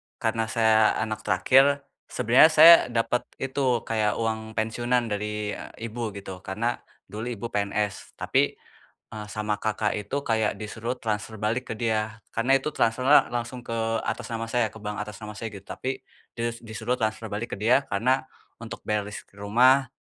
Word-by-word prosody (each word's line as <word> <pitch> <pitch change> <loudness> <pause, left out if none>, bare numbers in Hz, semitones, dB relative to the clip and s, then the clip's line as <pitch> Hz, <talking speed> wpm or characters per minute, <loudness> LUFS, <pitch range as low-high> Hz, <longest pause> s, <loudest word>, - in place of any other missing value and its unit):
karena 110 0 -1
saya 110 -1 +4
anak 110 -1 -4
terakhir, 140 +2 +4 0.2
sebenarnya 125 +6 +5
saya 160 +2 +10
dapat 120 +1 -1
itu, 130 -3 0
kayak 110 -2 0
uang 110 -1 -3
pensiunan 120 +1 0
dari, 105 0 -2
eee, - - -9 0.2
ibu 120 0 -3
gitu, 95 -2 -8
karena 110 +6 -2 0.3
dulu 110 +4 -5
ibu 120 -2 -5
PNS. 100 0 -2
Tapi, - - +1 0.6
eee, 105 -1 -6
sama 105 -1 -1
kakak 105 0 -1
itu 105 +7 -3
kayak 110 -2 +1
disuruh 115 +3 -5
transfer 110 0 -3
balik 115 +5 -2
ke - - -3
dia, 110 -1 -1 0.2
karena 130 +4 +3
itu 150 +2 -5
transfernya 130 +6 +4
langsung 120 +1 -4
ke 115 - -8 0.3
atas - - -3
nama 115 -1 -4
saya, 120 -2 +2
ke 110 0 -13
bank 105 0 -4
atas 105 0 -5
nama 105 - -6
saya, 110 +2 -6
gitu. 100 - -10
Tapi 130 +6 -4 0.4
dis 115 0 -3
disuruh 115 +2 -3
transfer 110 0 -2
balik 105 +3 -4
ke - - -12
dia, 125 +5 +3
karena 130 +6 +1 0.3
untuk 115 -1 -8
bayar 105 -1 -1
listrik 105 -1 -10
rumah, 130 +6 +4
115 Hz, 170 wpm, -26 LUFS, 105-120 Hz, 0.6 s, saya